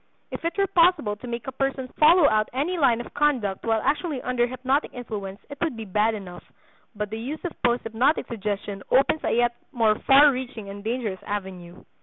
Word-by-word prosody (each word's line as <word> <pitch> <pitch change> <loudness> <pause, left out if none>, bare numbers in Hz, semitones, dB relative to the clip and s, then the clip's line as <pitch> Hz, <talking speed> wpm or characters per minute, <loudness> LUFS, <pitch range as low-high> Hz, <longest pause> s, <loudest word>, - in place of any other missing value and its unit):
If - - -6
it 335 +3 -2
were 395 - +3
possible 340 - +3
to 250 - -10
make 235 -2 -5
a - - -4
person 270 0 -2
follow 315 +1 +7
out 215 -2 +2
any 295 +8 -1
line 250 -8 +3
of - - -11
conduct 260 -10 0
while 225 -1 0
actually 295 +1 0
under 245 -1 +1
hypnotic 260 +4 -1
influence 205 -5 -6
it 285 -1 -10
would 320 -8 -1
be 225 - -6
bad 210 +3 +1
enough; 180 -4 -9 0.5
but 210 0 -4
the 220 - -4
use 290 +9 -6
of 350 - -2
posthypnotic 240 +4 +1
suggestion 205 -2 -4
opens 275 +4 +3
a - - 0
yet 240 0 +2 0.2
more 225 -3 +3
far 285 +2 +8
reaching 245 -5 -6
and 200 0 -8
dangerous 220 -4 -3
avenue. 190 -4 -6
240 Hz, 195 wpm, -25 LUFS, 210-280 Hz, 0.5 s, far